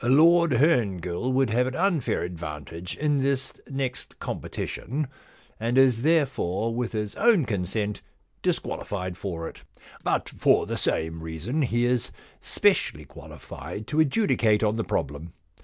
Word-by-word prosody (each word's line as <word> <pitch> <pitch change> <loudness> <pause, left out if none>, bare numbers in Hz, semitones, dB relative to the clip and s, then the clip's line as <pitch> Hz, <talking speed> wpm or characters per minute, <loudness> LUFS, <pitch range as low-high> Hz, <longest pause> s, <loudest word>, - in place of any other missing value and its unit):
Lord 160 +5 +5
Herngill 115 - +1
would 130 -2 +2
have 125 +3 +2
an 130 - -3
unfair 175 - +1
advantage 85 0 -6
in 145 -1 +1
this 135 0 0 0.2
next 135 -2 -4
com - - -4
petition, 140 +4 -4 0.5
and 115 +3 0
is 130 -4 +5
therefore 125 - +1
with 120 0 -2
his 105 -1 -2
own 220 - +4
consent 105 0 -2 0.4
disqualified 90 -3 -2
for 85 -3 -4
it. - - -10 0.4
But - - 0
for - - +3
the - - -3
same 80 +1 -1
reason 80 - -3
he 120 -3 +1
is 125 -1 +1 0.3
specially - - +1
qualified 110 - -9
to 155 - 0
adjudicate 135 - +3
on 105 0 +2
the 115 - -1
problem. 75 +1 -3
120 Hz, 140 wpm, -26 LUFS, 90-135 Hz, 0.5 s, Lord